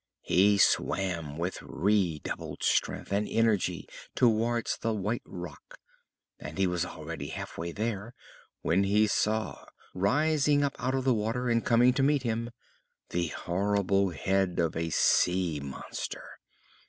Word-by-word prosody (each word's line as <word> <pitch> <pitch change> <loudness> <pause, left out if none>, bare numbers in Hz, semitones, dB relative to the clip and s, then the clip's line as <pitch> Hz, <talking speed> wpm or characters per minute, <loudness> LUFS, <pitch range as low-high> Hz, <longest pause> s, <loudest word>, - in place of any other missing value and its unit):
He 100 +3 +4
swam 85 -7 +1
with 85 +3 -3
redoubled 95 -6 -1
strength - - 0
and 105 +1 0
energy 105 -6 +1 0.3
towards 115 0 +2
the 115 -1 -1
white 105 +4 -2
rock; 90 -2 -9 0.6
and - - -8
he 95 - +3
was 90 -1 0
already 80 -2 -7
half 80 - -6
way 85 +1 -4
there 110 +2 -4 0.5
when 90 +4 +2
he 105 +2 +3
saw, 110 +1 -1 0.3
rising 145 +8 +2
up 140 - -1
out 130 +1 0
of 135 - -1
the 130 -1 +3
water 115 +3 -1
and 115 0 +2
coming 120 +2 +4
to 135 - 0
meet 140 0 +2
him, 115 0 -2 0.6
the 85 -1 -1
horrible 100 +4 0
head 95 +2 0
of 85 -2 0
a 80 0 -1
sea 90 0 +2
monster. 70 -1 -6
100 Hz, 140 wpm, -29 LUFS, 90-115 Hz, 0.6 s, He